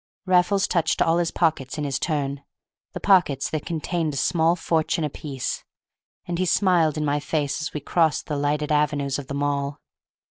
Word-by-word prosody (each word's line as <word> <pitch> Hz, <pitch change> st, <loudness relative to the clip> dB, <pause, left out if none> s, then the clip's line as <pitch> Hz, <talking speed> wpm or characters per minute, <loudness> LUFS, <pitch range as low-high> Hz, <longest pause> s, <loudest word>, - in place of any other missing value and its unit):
Raffles 185 Hz, +2 st, +3 dB
touched 170 Hz, -2 st, +1 dB
all 165 Hz, +1 st, +3 dB
his 170 Hz, -1 st, +1 dB
pockets 155 Hz, -6 st, 0 dB
in 150 Hz, -, -2 dB
his 140 Hz, -2 st, -1 dB
turn, 140 Hz, -4 st, -2 dB, 0.5 s
the -, -, -4 dB
pockets 175 Hz, -9 st, +3 dB
that 155 Hz, -2 st, -3 dB
contained 165 Hz, -2 st, -2 dB
a -, -, -3 dB
small 165 Hz, +3 st, +2 dB
fortune 165 Hz, -1 st, 0 dB
apiece, 140 Hz, -3 st, -4 dB, 0.6 s
and 175 Hz, 0 st, -3 dB
he 185 Hz, -, +2 dB
smiled 170 Hz, -4 st, +3 dB
in 155 Hz, -, -1 dB
my 145 Hz, 0 st, +1 dB
face 145 Hz, -1 st, -2 dB
as 155 Hz, -, -3 dB
we 150 Hz, -, -5 dB
crossed 160 Hz, +1 st, +1 dB
the 150 Hz, -, -3 dB
lighted 145 Hz, +1 st, -1 dB
avenues 145 Hz, -2 st, +1 dB
of 135 Hz, -, -8 dB
the 140 Hz, -, -4 dB
Mall. 140 Hz, 0 st, -1 dB
150 Hz, 180 wpm, -24 LUFS, 145-170 Hz, 0.6 s, Raffles